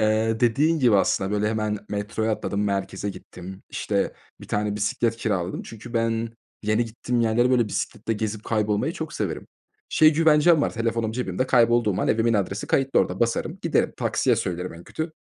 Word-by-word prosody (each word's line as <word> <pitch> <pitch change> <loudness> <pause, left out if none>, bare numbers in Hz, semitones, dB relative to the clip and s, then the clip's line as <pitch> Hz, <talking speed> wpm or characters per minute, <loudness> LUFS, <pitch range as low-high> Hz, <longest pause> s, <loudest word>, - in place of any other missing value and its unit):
Eee, 110 +1 +1
dediğin 145 +8 +3
gibi 120 -6 +4
aslında, 95 0 +1
böyle, 105 +1 +1
hemen 110 -1 -1
metroya 105 +2 -2
atladım, 105 -1 -2
merkeze 95 0 -2
gittim. 95 0 -10
İşte, - - -1 0.3
1 - - -12
tane 105 0 -1
bisiklet 115 +2 0
kiraladım 95 -5 -2
çünkü 115 +2 -10
ben 115 0 0 0.3
yeni 110 +3 +1
gittiğim 120 +1 -2
yerlere, 115 +2 +2
böyle, 120 -4 +3
bisikletle 115 - -3
gezip, 110 0 -3
kaybolmayı 105 -2 0
çok - - -6
severim. - - -3 0.4
Şey 155 0 +5
güvencem 155 0 +4
var: - - 0
Telefonum 115 -1 -1
cebimde 125 +1 -2
kaybolduğum 120 -5 +3
an - - 0
evimin 115 +1 +2
adresi 100 0 -1
kayıtlı 135 0 +2
orada. 95 +1 -2
Basarım, 115 0 0
giderim; - - +1
taksiye - - +1
söylerim 90 0 -3
en 85 +1 -12
kötü, 160 0 -5
110 Hz, 170 wpm, -24 LUFS, 105-120 Hz, 0.4 s, Şey